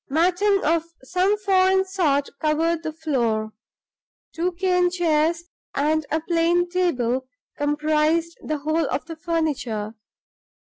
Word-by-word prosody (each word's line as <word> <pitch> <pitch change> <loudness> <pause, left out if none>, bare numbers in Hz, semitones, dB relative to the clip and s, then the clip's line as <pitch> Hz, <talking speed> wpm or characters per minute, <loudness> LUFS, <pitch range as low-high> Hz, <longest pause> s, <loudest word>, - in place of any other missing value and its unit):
Matting 365 +6 +2
of 325 +1 +2 0.2
some 370 +8 +1
foreign 380 -1 +3
sort 315 -8 +1
covered 320 +2 +1
the 320 -1 -4
floor. 235 -9 -1 0.8
Two 350 +2 -1
cane 360 0 +2
chairs 335 -1 +1 0.3
and 305 +1 +1
a 315 - +1
plain 340 +1 +2
table 265 -9 0 0.3
comprised 305 +3 +1
the 305 - -2
whole 310 +2 0
of 280 - -2
the 330 0 -7
furniture. 290 -10 -2
325 Hz, 115 wpm, -23 LUFS, 295-355 Hz, 0.8 s, foreign